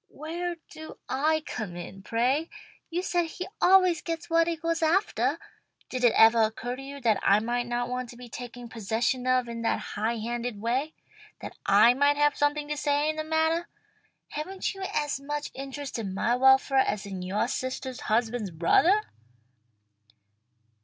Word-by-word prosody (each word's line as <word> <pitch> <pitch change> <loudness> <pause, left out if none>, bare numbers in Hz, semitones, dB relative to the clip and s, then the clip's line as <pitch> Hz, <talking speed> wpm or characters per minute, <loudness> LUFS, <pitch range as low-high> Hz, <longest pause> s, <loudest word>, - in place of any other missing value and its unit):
"Where 345 +3 -4 0.2
do 315 0 -10
I 310 +4 +1
come 205 -7 -5
in, 175 +2 -8
pray? 255 - 0 0.4
You 345 +2 -2
say 350 -2 0
he 360 +3 -6
always 370 -3 +5
gets 330 0 -5
what 330 0 +4
he 340 - 0
goes 330 0 -1
aftah. 340 +6 +1 0.5
Did 255 -1 -4
it 240 - +5
evah 225 0 +7
occur 245 +3 -5
to 265 - -9
you 280 +1 -8
that 220 -5 +2
I 200 - +4
might 240 +2 -2
not 240 0 -1
want 250 0 -4
to 240 - -11
be 245 0 -10
taken 245 0 -8
possession 230 +3 -1
of 255 -1 +2
in 230 0 -5
that 230 - +1 0.2
high 220 +3 -1
handed 235 0 -4
way? 255 +8 -1 0.5
That - - -8
I 240 - +7
might 285 +2 +3
have 295 0 +3
something 290 0 0
to 300 - -2
say 290 +1 +1
in - - -9
the 310 - -3
mattah? 320 +2 +1 0.6
Haven't 375 +7 -4
you 390 - -10
as 295 -2 -1
much 295 +1 -4
interest 275 -1 -6
in 195 -4 -4
my 235 +4 +1
welfare 265 +1 +5
as 210 -5 0
in 190 -2 -6
yoah 190 +5 0
sistah's 260 0 -4
husband's 225 -1 0
brothah?" 255 - +3
260 Hz, 175 wpm, -27 LUFS, 235-310 Hz, 0.6 s, evah